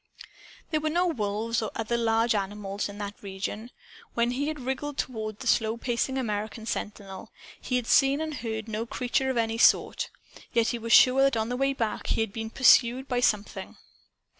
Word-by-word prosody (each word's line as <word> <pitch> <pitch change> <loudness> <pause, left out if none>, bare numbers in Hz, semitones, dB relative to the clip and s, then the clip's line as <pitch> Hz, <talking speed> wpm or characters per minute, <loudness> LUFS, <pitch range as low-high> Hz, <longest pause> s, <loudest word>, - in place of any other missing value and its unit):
There 310 - +1
were 310 - 0
no 350 +3 +1
wolves 225 - -1
or 220 - -2
other 225 +1 -1
large 230 0 +2
wild 200 -2 +1
animals 205 -1 -4
in 205 - -9
that 205 0 -6
region. 200 +3 -5 0.5
When 235 +1 +2
he 275 +4 -2
had 310 -1 -3
wriggled 265 +3 -4
toward 215 -4 -4
the 260 - -9
slow 225 -1 +2
pacing 245 +2 -1
American 220 -2 -3
sentinel, 205 -2 -5 0.3
he 250 - -2
had 250 -2 0
seen 270 +4 +4
and 315 -1 -3
heard 225 -4 -4
no 220 +1 -3
creature 265 +1 -1
of 260 - -1
any 225 0 0
sort. - - +3 0.4
Yet 230 -1 +3
he 240 - -2
was 230 0 -5
sure 255 +2 +7
that 275 -3 +3
on 220 +1 -1
the 245 - -2
way 275 +2 +1
back 225 -5 -3
he - - +1
had 220 -3 -2
been 225 0 -4
pursued 255 +1 +4
by 250 - -1
by - - +3
Something! 210 -4 -1
230 Hz, 200 wpm, -27 LUFS, 215-260 Hz, 0.5 s, sure